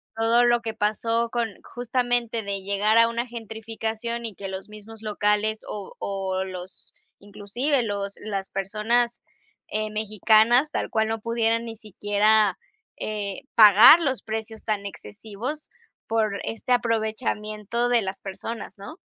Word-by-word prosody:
todo 230 +2 +3
lo 240 -1 +3
que 225 -1 -4
pasó 230 +2 0
con 235 -1 -1
justamente 245 -1 -1
de 200 -2 -3
llegar 200 +3 +2
a 230 0 +6
una 235 +1 -2
gentrificación 225 0 -4
y 225 - -4
que 195 +1 -7
los 190 +1 -7
mismos 215 +1 -12
locales 210 0 0
o 205 -2 -7
o 190 -1 -2
los 185 -1 -8 0.3
inclusive 240 +7 -1
los 200 -2 -3
las 200 -2 -4
personas, 225 +5 0 0.5
eh, 215 0 -2
mexicanas 220 +5 +3
tal - - -2
cual 220 0 +1
no 225 0 -2
pudieran 230 +1 0
ni 225 -1 -6
siquiera 210 -1 +2 0.4
eh 205 -2 -4
pagar 215 - +9
los 270 -6 -1
precios 220 0 -5
tan 210 -2 -2
excesivos 220 +8 -7 0.4
por 215 -3 0
este 225 +3 -5
aprovechamiento 220 -1 0
de 240 -1 +4
las 195 -1 -5
personas, 205 +3 -7
¿no? 200 +10 -9
220 Hz, 140 wpm, -25 LUFS, 205-230 Hz, 0.5 s, pagar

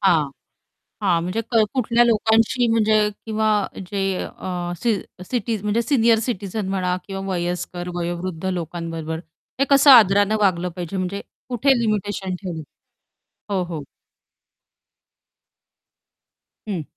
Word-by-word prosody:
हां, 160 -7 +3 0.7
हां. 175 -4 +3
म्हणजे 185 +6 -2
क 225 -3 +4
कुठल्या 240 -1 +3
लोकांशी 225 +2 +3
म्हणजे 220 -1 +3 0.3
किंवा 220 0 0 0.4
जे 200 - -2 0.2
अ, 175 -1 -5
सी 230 +4 +1 0.3
सिटी 230 0 -1
म्हणजे 210 +3 +1
सीनियर 235 -3 +3
सिटीझन 200 -2 -3
म्हणा 185 -2 0
किंवा 195 -1 -5
वयस्कर, 175 0 -3
वयोवृद्ध 175 0 -4
लोकांबरोबर 165 -2 -3 0.4
हे - - +5
कसं 280 +1 +7
आदराने 205 -4 +7
वागलं 180 -3 +2
पाहिजे 180 +1 -4
म्हणजे 185 +2 -2 0.3
कुठे 255 +1 +3
लिमिटेशन 205 -4 -1
ठेवलं? 170 -4 -5 0.9
हो, 190 -2 +1
हो. 165 -4 -5 2.9
हं. 185 -6 -2
195 Hz, 115 wpm, -22 LUFS, 175-225 Hz, 2.9 s, कसं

